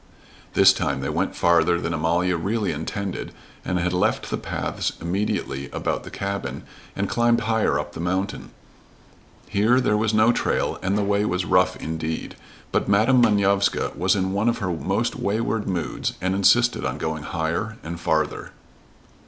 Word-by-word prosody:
This - - +7
time 70 -1 -2
they 70 - -2
went - - -1
farther 85 0 +3
than 85 0 -2
Amalia 85 +3 +1
really 100 +5 -1
intended, 90 +5 -4 0.3
and 90 - -1
had 90 +1 0
left 90 - 0
the - - 0
paths - - -3
immediately 85 -6 -2
about - - -2
the - - -9
cabin, 100 0 -4 0.3
and 100 +1 -1
climbed 120 +1 +2
higher 110 0 +1
up - - -4
the - - -8
mountain. 95 +3 -2 1.0
Here 110 +6 +3
there 105 -4 +2
was 110 0 +1
no 110 +2 +4
trail - - -1
and 95 +2 0
the 105 - +1
way 100 +1 +1
was 90 -3 -1
rough 90 +1 +3
indeed, 80 0 -4 0.4
but - - 0
Madam 115 +6 +4
Manovska 100 -3 +2
was 95 +3 +2
in 95 -1 -1
one 105 +4 +2
of 120 - 0
her 90 -5 -2
most 100 +8 -1
wayward 110 +1 -1
moods 90 -4 -2
and 95 +1 0
insisted 120 +5 +3
on - - -2
going 80 -1 -3
higher 85 +7 -3
and 85 +1 -6
farther. 80 -2 -1
95 Hz, 165 wpm, -23 LUFS, 85-105 Hz, 1.0 s, This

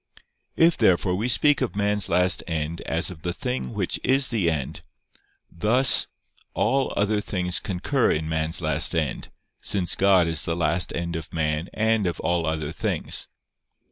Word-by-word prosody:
If, 165 0 +3
therefore, 95 -4 +3
we 105 +6 -1
speak 145 +4 +3
of 125 -5 -2
man's 105 -1 +2
last 90 -1 +2
end 80 0 -3
as 85 +3 0
of 80 -4 -12
the 85 +1 -3
thing 65 -3 -4
which - - -2
is 135 +1 +2
the 105 -8 +1
end, 75 -5 -4 0.7
thus 115 +9 +4 0.5
all 135 +5 +1
other 105 +1 +1
things 90 -3 -1
concur 105 +8 -1
in 80 0 -2
man's 80 +1 -1
last 80 +3 +2
end, 75 -6 -2 0.3
since 95 -4 -1
God 95 -3 +4
is 80 -1 -1
the 85 - -2
last 85 +1 -1
end 85 0 -3
of 80 -1 -6
man 80 +1 -2
and 110 -2 +1
of 85 - -3
all 85 -2 0
other 80 -1 -2
things. - - -2
90 Hz, 165 wpm, -24 LUFS, 80-105 Hz, 0.7 s, thus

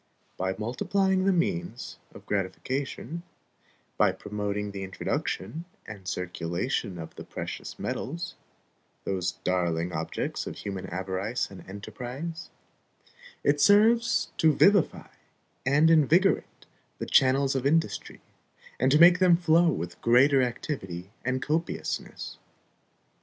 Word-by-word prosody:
By 95 +1 -2
multiplying 190 - 0
the 195 - +4
means 175 -6 -2 0.2
of - - -12
gratification, 130 - -3 0.8
by - - +5
promoting 105 0 -3
the 100 -1 -6
introduction 95 - -3 0.2
and 100 -3 -10
circulation 90 - -2
of 80 -1 -8
the - - -9
precious - - -6
metals, 170 +5 -4 0.7
those 95 -2 -1
darling 85 -2 0
objects 80 +1 -3
of - - -5
human 95 -2 -5
avarice 95 +6 -3
and 95 - -10
enterprise, 125 - -6 0.9
it 145 0 +2
serves 225 +7 +4
to 155 -2 +4
vivify 200 -3 +3 0.6
and 150 +4 +5
invigorate 165 +5 +3 0.3
the - - -4
channels 135 +1 +4
of 135 0 0
industry, 160 +3 0 0.6
and 130 - +3
to 150 - +6
make 175 +2 +8
them 180 -2 +6
flow 170 0 +4
with 90 - -4
greater 130 +3 +5
activity 100 - -4
and 130 +1 -1
copiousness. 160 +4 -3
130 Hz, 115 wpm, -27 LUFS, -, 0.9 s, make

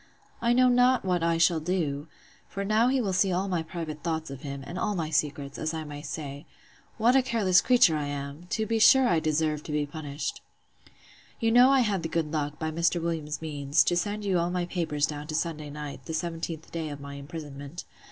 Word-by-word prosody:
I 235 0 +3
know 255 +1 +5
not 250 -1 +4
what 180 -2 +1
I 165 0 +2
shall 165 0 +4
do! 155 -3 -2 0.4
For 200 0 -4
now 215 +3 +3
he 265 +1 +2
will 200 -6 -1
see 185 +1 +2
all 185 +2 0
my 180 -3 0
private 160 -2 -6
thoughts 160 -2 -3
of 135 -1 -8
him, 140 -2 -6
and 175 +5 -6
all 210 -1 0
my 160 -3 -2
secrets, 145 -2 -1
as 155 +1 -2
I 160 - -3
may 145 -1 -8
say. 145 -2 -6 0.5
What 235 +3 +4
a 270 - +6
careless 220 -8 +3
creature 240 -10 +5
I 150 -1 -2
am!—To 145 +9 -4
be 225 +1 0
sure 260 +4 +7
I 170 -6 +3
deserve 155 -1 0
to - - -6
be 150 0 0
punished. 145 -1 -5 1.0
You 225 -1 +2
know 245 +2 +7
I 270 -1 +5
had 205 -6 0
the 165 - -4
good 160 -2 -1
luck, 150 -2 -2
by 160 -1 -3
Mr. 170 +2 +1
Williams's 160 -2 -3
means, 145 -1 +2
to 175 - +1
send 205 +4 -2
you 190 -3 +2
all 170 +1 0
my 180 -1 -1
papers 165 -5 0
down 150 -1 -6
to 155 - -4
Sunday 155 -2 -2
night, 150 -1 -7
the 160 - -5
17th 165 -1 -4
day 165 -2 -3
of 145 -1 -7
my 140 0 -8
imprisonment. 145 +1 -8
165 Hz, 220 wpm, -27 LUFS, 150-190 Hz, 1.0 s, sure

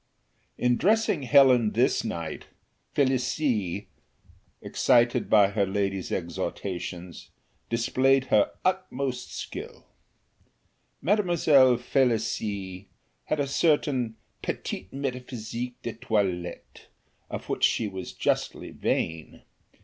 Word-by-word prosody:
In 125 -1 +2
dressing 215 -5 +2
Helen 130 -4 +5
this 125 +3 +2
night, 85 -8 -5 0.5
Felicie, 125 - 0 0.7
excited 120 -1 +2
by 105 -3 +6
her 100 -1 0
lady's 95 -1 -2
exhortations, 90 0 -5 0.4
displayed 130 +3 +2
her 105 -1 +5 0.2
utmost 140 -9 -1
skill. - - -7 1.2
Mademoiselle 160 - +4
Felicie 110 -7 -1 0.4
had 155 - -1
a 145 - +2
certain 140 -5 +1 0.3
petite 95 - -4
métaphysique 125 -3 -5
de 115 - -3
toilette, 95 -6 -3 0.4
of - - -6
which - - -3
she 110 - +3
was 95 -2 -6
justly - - -1
vain. 80 -1 -2
120 Hz, 90 wpm, -27 LUFS, 100-135 Hz, 1.2 s, by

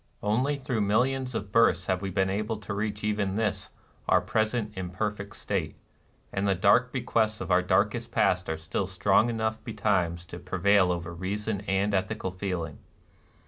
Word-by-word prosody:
Only 125 +8 +1
through 125 -5 -2
millions 125 +5 +1
of 100 -2 -4
births 90 -6 +4
have 95 -1 0
we 100 - -3
been 95 +1 +1
able 105 +3 -2
to 105 -1 -6
reach 105 0 -3
even 105 -2 0
this 105 -3 -1 0.4
our - - +6
present 110 -1 -1
imperfect 100 +3 -4
state; 85 -7 -3 0.6
and 95 +1 0
the 100 - +3
dark 105 +7 +4
bequests 110 -4 0
of 95 0 -4
our 90 +1 +5
darkest 105 +6 +1
past 90 -6 +2
are 80 - -1
still 80 +4 -3
strong 100 +4 +3
enough 110 -1 -2
betimes 95 -7 0
to - - -9
prevail 95 0 +3
over 85 -1 -4
reason 100 +3 -3
and 100 +2 +1
ethical 95 0 -1
feeling. 90 -5 -4
100 Hz, 165 wpm, -28 LUFS, 95-110 Hz, 0.6 s, our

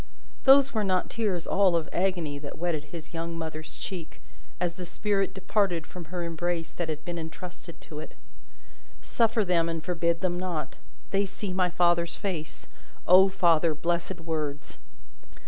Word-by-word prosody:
those 275 0 +7
were 215 -2 +1
not 185 -2 +1
tears 200 -7 -1
all 190 -3 +4
of 165 -1 0
agony 175 -6 0
that 145 0 -7
wetted 160 -3 -1
his 160 +1 -9
young 165 0 -3
mother's 155 -1 -5
cheek, 175 -5 -6 0.4
as 175 -1 0
the 180 - -7
spirit 195 +2 0
departed 190 -3 0
from 175 0 -9
her 175 +2 -4
embrace 170 0 -2
that 175 -2 -3
had 155 -1 -4
been 175 -1 -3
entrusted 170 +1 -8
to 150 - -9
it. 155 - -9 0.9
Suffer 225 -2 +2
them 170 -2 +2
and 165 -1 -3
forbid 170 -2 0
them 175 -2 0
not. 170 -6 -3 0.3
They 200 +1 +2
see 190 0 -5
my 180 -1 +2
Father's 170 -1 +2
face. 170 -6 -4 0.4
O 190 +2 +8
Father, 170 -4 +3
blessed 170 +3 -1
words! 155 -3 -3
175 Hz, 160 wpm, -28 LUFS, 165-185 Hz, 0.9 s, O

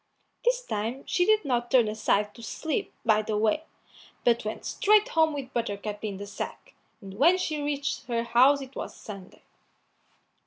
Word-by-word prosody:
This - - +2
time 230 - -3
she 355 - +2
did 430 0 +4
not 240 -3 0
turn 250 -5 +5
aside 210 -1 0
to 235 - -13
sleep 295 +6 -3
by 215 -2 +4
the 215 0 -2
way, 225 +9 +1 0.6
but 235 -1 +3
went 215 0 -5
straight 425 +1 +3
home 320 -1 +3
with 280 -3 -6
Buttercup 210 -2 -3
in 205 -3 -3
the 200 - -6
sack, 200 - -7 0.3
and 195 -2 -9
when 340 +6 +6
she 310 -5 -2
reached 290 -1 -2
her 235 -2 0
house 255 +4 +5
it 270 0 -10
was - - -6
Sunday. 195 -3 -11
240 Hz, 170 wpm, -27 LUFS, 215-295 Hz, 0.6 s, when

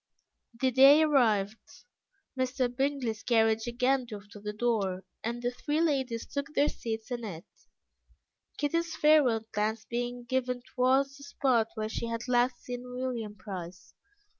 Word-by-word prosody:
The 260 0 +2
day 275 +5 +8
arrived, 220 - +1 0.5
Mr. 255 -1 -1
Bingley's 265 -5 -1
carriage 225 -1 +2
again 250 +2 +1
drove 205 -3 -9
to 205 - -10
the 210 +1 -4
door, 210 -4 -1 0.2
and 235 +2 -3
the 245 - +1
three 295 +5 -2
ladies 265 -8 0
took 280 +1 -5
their 290 - +4
seats 225 0 -5
in 240 -1 -3
it, 175 -6 -7 1.1
Kitty's 335 +3 -1
farewell 275 -8 +4
glance 215 +1 -1
being 245 0 -3
given 250 0 -1
towards 265 +2 +1
the 280 - -13
spot 260 -5 +1
where 215 -1 -2
she 230 +1 -4
had 230 +1 -4
last 245 0 +1
seen 245 -1 -5
William 250 -4 -4
Price. 185 -2 -8
245 Hz, 145 wpm, -30 LUFS, 220-265 Hz, 1.1 s, day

